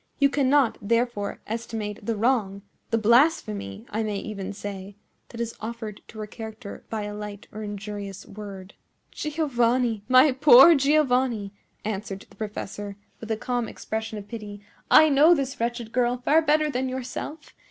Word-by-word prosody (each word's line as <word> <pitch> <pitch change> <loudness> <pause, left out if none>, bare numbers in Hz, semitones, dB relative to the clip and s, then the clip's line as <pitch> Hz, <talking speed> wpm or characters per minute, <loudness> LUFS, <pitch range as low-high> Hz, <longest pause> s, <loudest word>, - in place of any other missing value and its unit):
You 280 -1 +3
cannot, 275 -3 +3
therefore, 230 -1 -1
estimate 220 -2 -5
the 225 +2 -1
wrong—the 210 -2 -1
blasphemy, 215 - +2
I 220 - -1
may 210 -2 -2
even 200 -2 -5
say—that 205 +3 -10
is 235 -1 -2
offered 220 -2 -6
to 220 - -13
her 215 - -4
character 220 0 -9
by 220 -2 -3
a 205 0 -5
light 210 -1 -7
or 215 - -7
injurious 205 -2 -6
word." 195 -2 -9 0.4
"Giovanni! 245 -7 0
my 255 +3 +7
poor 265 +4 +8
Giovanni!" 260 -8 +2 0.3
answered 200 -2 -4
the - - -17
professor, 205 -1 -6 0.2
with 225 - -9
a 220 - 0
calm 245 0 -2
expression 220 0 -5
of 205 -1 -8
pity, 210 -3 -8 0.3
"I 315 - +8
know 305 +4 +6
this 270 -3 -3
wretched 235 -1 -2
girl 245 0 +1
far 295 +6 +3
better 305 0 +3
than 260 0 -1
yourself. 260 +4 -6
225 Hz, 150 wpm, -25 LUFS, 205-255 Hz, 0.4 s, poor